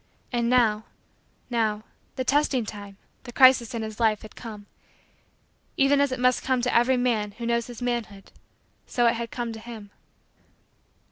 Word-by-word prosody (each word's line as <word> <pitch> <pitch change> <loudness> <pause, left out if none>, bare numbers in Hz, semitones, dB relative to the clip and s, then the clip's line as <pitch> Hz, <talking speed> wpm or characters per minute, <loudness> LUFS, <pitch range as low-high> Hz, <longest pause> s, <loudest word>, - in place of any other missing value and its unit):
And 235 -1 0
now 220 -4 +3 0.7
now 215 -3 0 0.3
the 260 - -2
testing 275 -3 +1
time 205 -2 -9 0.2
the 240 - -10
crisis 255 -2 +5
in 225 - -3
his 220 0 -7
life 220 -2 +2
had 215 - -12
come. 215 -3 -9 1.1
Even 280 +1 +4
as 285 -2 +1
it 255 - -3
must 250 0 +2
come 260 -1 0
to 250 - 0
every 250 +2 +4
man 225 -5 0
who 235 +3 -7
knows 235 0 0
his 245 -1 -8
manhood 230 -5 -4 0.6
so 240 - +1
it 230 - +4
had 235 0 -4
come 235 -1 -4
to 220 - -8
him. 220 -3 -10
235 Hz, 165 wpm, -25 LUFS, 220-250 Hz, 1.1 s, crisis